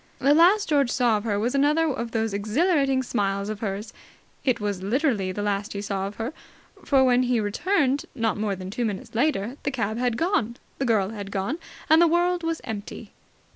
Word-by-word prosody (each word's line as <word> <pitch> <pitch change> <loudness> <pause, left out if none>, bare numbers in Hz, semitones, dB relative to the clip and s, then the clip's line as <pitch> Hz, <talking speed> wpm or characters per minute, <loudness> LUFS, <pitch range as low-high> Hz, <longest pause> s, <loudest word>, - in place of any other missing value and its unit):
The 280 - +3
last 365 +7 +5
George 285 -4 +3
saw 240 -3 +2
of 205 - -6
her 205 -3 0
was 235 +5 0
another 295 +3 +3
of 245 -5 -2
those 225 -2 -1
exhilarating 270 - +1
smiles 200 -4 -1
of 215 -1 -4
hers. 210 0 -4 0.5
It 255 -4 +1
was 205 -3 -2
literally 215 -2 0
the 205 +2 -4
last 205 0 -2
he 200 - -4
saw 195 -1 -2
of 205 - -8
her, 235 +6 -4 0.5
for, 270 -2 +4
when 250 -1 +4
he 250 -2 +1
returned 275 - 0
not 225 -3 0
more 210 -1 -1
than 185 0 -7
two 240 +3 -2
minutes 210 -4 -4
later, 245 -1 0
the - - -1
cab 230 -4 -2
had 245 -2 0
gone, 240 - 0 0.2
the 270 - 0
girl 210 -5 +2
had 205 -2 -7
gone, 200 - -2 0.3
and 315 +2 +6
the 345 - +6
world 350 +2 +2
was 330 -1 -2
empty. 210 -3 -7
235 Hz, 205 wpm, -25 LUFS, 205-280 Hz, 0.5 s, and